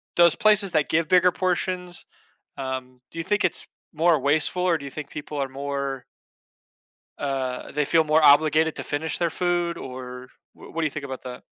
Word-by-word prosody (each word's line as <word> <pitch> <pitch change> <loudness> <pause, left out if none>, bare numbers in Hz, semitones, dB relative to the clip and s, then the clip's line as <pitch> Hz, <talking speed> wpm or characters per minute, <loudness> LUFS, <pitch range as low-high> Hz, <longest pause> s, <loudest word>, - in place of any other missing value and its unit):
those 170 -2 +6
places 210 -4 +4
that 155 -2 +2
give 165 0 +1
bigger 180 0 +5
portions, 180 -1 -2 0.5
um, 130 -1 -5
do 165 - -12
you - - -2
think 205 +1 +1
it's 180 - -1 0.3
more 165 0 +3
wasteful 155 +5 +1
or 175 -2 +3
do 140 - -10
you 140 - -7
think 145 +1 -7
people 150 0 -7
are 135 -1 -1
more 140 -1 -4 1.1
uh, 135 -3 -3
they 150 +1 +1
feel 160 +2 +3
more 155 +1 +3
obligated 155 +2 +5
to - - -4
finish 155 +2 -3
their 170 -1 +1
food 175 0 -1
or 125 -2 -8 0.3
wh - - -14
what 165 - -2
do - - +1
you 155 - 0
think 145 +1 -6
about 130 -2 -6
that? 125 -1 -8
155 Hz, 190 wpm, -24 LUFS, 135-170 Hz, 1.1 s, those